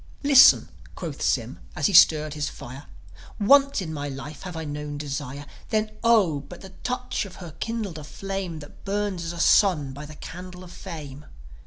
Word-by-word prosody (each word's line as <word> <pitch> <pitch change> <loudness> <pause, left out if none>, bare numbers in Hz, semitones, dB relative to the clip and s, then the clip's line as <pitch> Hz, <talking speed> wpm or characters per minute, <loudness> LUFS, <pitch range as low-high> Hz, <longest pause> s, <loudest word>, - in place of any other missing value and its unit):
"Listen," 280 -2 +7 0.3
quoth - - -6
Sym, - - 0 0.2
as - - -1
he 205 - +2
stirred 155 -4 +6
his 150 -1 -2
fire. 130 +4 -10 0.5
"Once 275 +1 +4
in 160 -2 -5
my 145 -1 -4
life 140 +2 -8
have 180 -2 -7
I 160 - -4
known 145 0 -5
desire. 145 -1 -5 0.2
Then, 215 0 0
Oh, 210 -11 +4
but 170 +5 -12
the 190 - -11
touch 250 0 -2
of 195 -3 -10
her 175 -3 -9
kindled 215 -8 -3
a - - -8
flame 190 0 -5
That 145 - -14
burns 200 -3 -2
as 165 - -4
a 170 - -8
sun 165 -8 +4
by 145 +2 -8
the 155 - -11
candle 180 +3 -9
of 180 - -12
fame. 150 -4 -9
170 Hz, 185 wpm, -25 LUFS, 145-200 Hz, 0.5 s, Listen